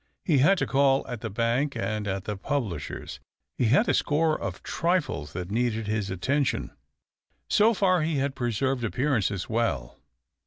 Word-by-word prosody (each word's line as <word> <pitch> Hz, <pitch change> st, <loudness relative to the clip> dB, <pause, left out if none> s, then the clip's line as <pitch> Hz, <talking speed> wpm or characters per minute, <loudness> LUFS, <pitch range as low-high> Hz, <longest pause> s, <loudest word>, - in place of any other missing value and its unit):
He 150 Hz, -6 st, +3 dB
had 190 Hz, +9 st, +5 dB
to -, -, 0 dB
call 135 Hz, 0 st, +3 dB
at 120 Hz, -4 st, -6 dB
the 115 Hz, -, -3 dB
bank 120 Hz, +7 st, 0 dB
and 110 Hz, -2 st, -2 dB
at 95 Hz, -1 st, -2 dB
the 105 Hz, -, -3 dB
publishers, 100 Hz, -, -4 dB, 0.4 s
he 125 Hz, -, +3 dB
had 140 Hz, -, +4 dB
a -, -, +3 dB
score 155 Hz, +1 st, +2 dB
of -, -, -5 dB
trifles 155 Hz, -, -1 dB
that 90 Hz, +1 st, -5 dB
needed 115 Hz, -1 st, 0 dB
his 105 Hz, -1 st, -1 dB
attention. 125 Hz, +6 st, 0 dB, 0.8 s
So 220 Hz, +2 st, +5 dB
far 185 Hz, -3 st, +3 dB
he 155 Hz, 0 st, 0 dB
had 140 Hz, 0 st, 0 dB
preserved 125 Hz, +1 st, -1 dB
appearances 110 Hz, -3 st, 0 dB
well. 110 Hz, -, -1 dB
120 Hz, 160 wpm, -27 LUFS, 105-145 Hz, 0.8 s, had